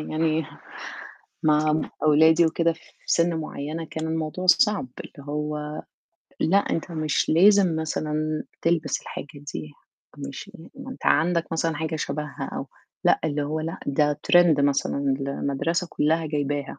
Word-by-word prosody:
يعني 155 0 0 1.0
مع 155 0 +3 0.2
أولادي 160 +2 +6
وكده، 165 +1 +1
في 165 - -16 0.3
سن 170 0 +2
معيّنة 155 +1 -4
كان 160 0 -5
الموضوع 160 +3 -3
صعب، 210 - +4
اللي 140 -1 -11
هو 150 0 -3 0.6
لأ، 180 +5 +3
أنت 175 -3 -1
مش 155 -2 0
لازم 190 0 +5
مثلًا 155 -1 -2 0.2
تلبس 165 -1 +1
الحاجة - - -7 0.3
دي، 75 -1 -6 0.5
مش 70 - -7
لا - - -13
ما - - -8
أنت - - -10
عندك 165 - +2
مثلًا 165 -1 0
حاجة 160 +1 -2
شَبها، 150 0 -4
أو - - -4 0.4
لأ، - - +4
اللي 145 -1 -1
هو 155 +2 -2
لأ، 165 +1 -4
ده 145 +1 +1
trend 175 -4 +6
مثلًا 140 -1 +1
المدرسة 150 +5 -1
كلّها 160 +2 +1
جايبها. 145 -2 -1
155 Hz, 140 wpm, -25 LUFS, 150-165 Hz, 1.0 s, أولادي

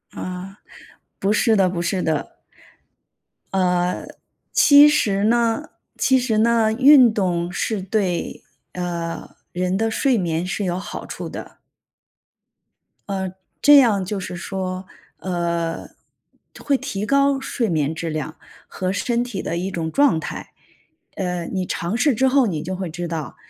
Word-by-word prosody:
嗯， 185 +1 -6 0.6
不 195 - +1
是 220 +1 +3
的 190 -3 +3
不 175 -1 -3
是 180 +2 -1
的。 160 -3 -2 1.1
呃， 180 -1 0 0.5
其 290 0 +8
实 205 -10 +2
呢 235 +5 +1 0.3
其 265 - +3
实 235 -4 0
呢， 225 -1 +3
运 260 -1 +7
动 175 -4 -1
是 200 +2 -2
对， 190 -2 -2 0.3
呃， 170 -2 -5 0.2
人 180 +1 -1
的 225 +2 0
睡 255 +2 +2
眠 170 -3 -1
是 185 +3 -3
有 175 -1 -1
好 195 - -7
处 - - -7
的。 - - -10 1.5
嗯， 190 -1 -2 0.3
这 290 0 +8
样 215 -8 +3
就 200 +2 -3
是 185 -1 -6
说， 185 +1 -4 0.3
呃， 170 -2 -3 0.7
会 280 - +1
提 205 -5 -4
高 275 +1 +3
睡 250 -3 -2
眠 155 -3 0
质 165 0 -4
量 155 0 -4 0.3
和 185 -1 -3
身 235 +4 0
体 240 -6 -5
的 170 - -3
一 185 +3 -2
种 165 -3 -3
状 280 - +3
态。 - - -7 0.6
呃， 180 -2 -3
你 185 0 -3
尝 175 +6 -2
试 265 +3 +3
之 265 +4 +2
后， 265 -1 +4
你 160 -7 -2
就 185 +3 -4
会 185 -1 -4
知 175 +2 -5
道， 160 -7 -5
190 Hz, 155 characters per minute, -21 LUFS, 175-230 Hz, 1.5 s, 其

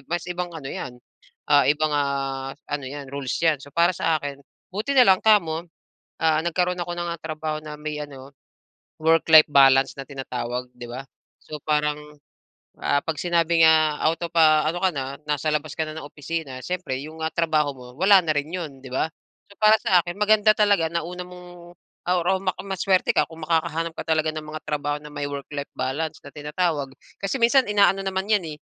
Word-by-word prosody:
mas 175 0 -3
ibang 180 0 -4
ano 155 -5 -7
'yan, 130 - -5 0.6
ah, 145 -1 +6
ibang, 155 +1 +2
ah, 135 -1 -2 0.2
ano 145 -1 -3
'yan, 140 +1 -7
rules 140 -2 -4
'yan. 160 -2 +3
So, 140 - -15
para 170 +1 +4
sa 160 -1 +1
akin 140 -1 -6 0.3
buti 210 +8 -2
na 250 -4 +6
lang 185 - +3
kamo, 170 -7 +3 0.6
ah, 160 -1 +3
nagkaroon 180 +1 0
ako 175 0 -3
ng, 175 0 -4
ah, 170 0 -4
trabaho 155 -1 -4
na 150 -1 -7
may 150 0 -4
ano, 135 -2 -12 0.7
work-life 160 -1 +6
balance 135 -1 +5
na 135 - -5
tinatawag, 125 -2 -5
'di 120 0 -8
ba? 125 +3 -6 0.4
So, 155 - -6
parang, 150 -1 +1 0.9
ah, - - +2
'pag 160 -2 -3
sinabi 170 -1 +2
nga 155 -2 +4
out 160 +1 +2
of, 170 - -5
ah, 155 -1 +5
ano 170 +2 -2
ka 190 - +4
na, 135 -2 -2 0.2
nasa 150 +1 -1
labas 150 0 -3
ka 160 - +1
na 155 - -7
ng 145 - -8
opisina, 145 -2 -5
siyempre 180 -8 -3
'yong, 155 +3 -9
ah, 160 - -1
trabaho 155 -3 +1
mo, 125 - -12
wala 195 +2 +7
na 155 - +1
rin 145 +2 -2
'yon, 155 -7 -5
'di 130 - -10
ba? 135 - +1 0.4
So, - - -15
para 215 +1 +7
sa 180 -2 +4
akin 175 +1 -6
maganda 215 0 +5
talaga 205 -6 +3
na 170 -1 -2
una 180 +1 -6
mong 175 -1 -13 0.3
or, 180 -1 +2
ah, 190 0 +3
ma 185 -1 0
maswerte 190 -1 +1
ka - - +3
kung 165 0 -12
makakahanap 165 0 0
ka - - -4
talaga 155 0 +1
ng 155 - -5
mga 155 0 -7
trabaho 145 0 -2
na 150 - -10
may 145 -1 -4
work-life 140 0 -6
balance 145 +5 -3
na 140 - -10
tinatawag. 150 -1 -2 0.3
Kasi 200 +7 -2
minsan 250 +3 +4
ina-ano 200 -1 +4
naman 190 0 -2
'yan, 210 -3 +3
eh, - - -30
160 Hz, 200 wpm, -24 LUFS, 145-175 Hz, 0.9 s, wala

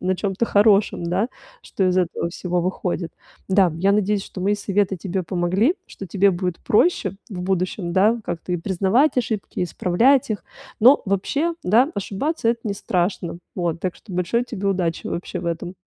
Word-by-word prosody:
на 185 +1 0
чем-то 195 +3 -1
хорошем, 205 -2 +3
да, 185 +7 0 0.3
что 190 - -2
из 185 0 +2
этого 175 -1 -1
всего 180 0 -2
выходит. 180 -2 -2 0.4
Да, 190 -3 +4
я 195 +4 +2
надеюсь, 205 -1 +1
что 185 - -9
мои 200 +3 +2
советы 200 -1 0
тебе 185 +2 -3
помогли, 185 - +1
что 195 - -9
тебе 195 +2 +3
будет 180 -1 -2
проще 210 - +2
в 190 -4 -6
будущем, 185 -1 -1
да, 210 +6 +3
как-то 175 +2 -4
и - - +1
признавать 195 - +2
ошибки, 220 -4 -3
и - - +2
исправлять 230 +10 +2
их. 210 - -3 0.4
Но 255 +6 +7
вообще, 280 - 0
да, 235 - +4
ошибаться- 225 - -2
это 235 0 +1
не 205 -2 -2
страшно. 175 -2 -2 0.2
Вот, 170 -2 -1
так 185 -2 -3
что 200 - -13
большой 180 +7 0
тебе 205 -5 -3
удачи 180 -4 -1
вообще 180 +1 -4
в 170 - -6
этом. 170 +2 -3
190 Hz, 175 wpm, -22 LUFS, 180-210 Hz, 0.4 s, Но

